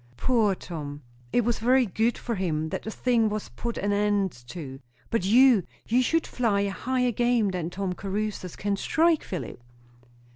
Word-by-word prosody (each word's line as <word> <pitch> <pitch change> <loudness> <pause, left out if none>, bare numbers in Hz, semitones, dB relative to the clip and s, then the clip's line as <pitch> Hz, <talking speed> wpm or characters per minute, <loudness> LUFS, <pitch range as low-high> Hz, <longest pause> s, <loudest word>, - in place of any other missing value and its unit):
"Poor 225 -6 +2
Tom!" 150 -5 -7 0.3
"It - - +3
was 240 -1 0
very 250 +3 +4
good 225 +4 0
for 235 - -3
him, 160 -6 -1
that - - -3
the - - -6
thing 230 -1 +1
was 215 0 -4
put 235 - -5
an 205 +1 0
end 205 -2 +1 0.2
to. 135 -3 -7 0.3
But 230 -5 0
you 240 +1 +6 0.3
you 245 +3 +3
should 325 +6 +1
fly 215 -5 0
at 200 - -1
higher 250 +4 0
game 240 -2 +2
than 175 -3 -3
Tom 190 0 -3
Caruthers 195 -1 -4
can 200 0 -1
strike, 325 +7 +2
Philip." 145 -9 -6
210 Hz, 175 wpm, -26 LUFS, 185-240 Hz, 0.3 s, you